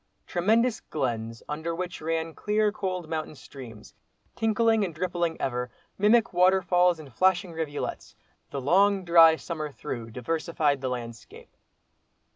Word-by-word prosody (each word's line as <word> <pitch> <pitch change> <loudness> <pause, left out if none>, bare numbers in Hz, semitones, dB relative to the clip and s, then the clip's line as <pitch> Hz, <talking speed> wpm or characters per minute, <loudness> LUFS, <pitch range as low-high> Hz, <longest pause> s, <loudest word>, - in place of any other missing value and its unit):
Tremendous 220 +6 +1
glens, 115 -5 -4
under 160 +3 -3
which 180 +1 -5
ran 165 0 -2
clear 210 +2 +1
cold 185 -4 -4
mountain 155 -1 -4
streams, 120 -6 -12 0.4
tinkling 225 0 +2
and 170 -5 -4
rippling 175 -1 -2
ever, 125 -1 -2 0.3
mimic 215 +2 +3
waterfalls 180 -1 +3
and 145 -6 -12
flashing 185 +5 +2
rivulets, 160 -3 -5 0.3
the 140 - -4
long 190 +7 +3
dry 165 -2 +7
summer 155 -2 -5
through 120 -5 -6
diversified 150 +3 -1
the 130 - -2
landscape. 120 -3 -8
165 Hz, 125 wpm, -27 LUFS, 140-185 Hz, 0.4 s, dry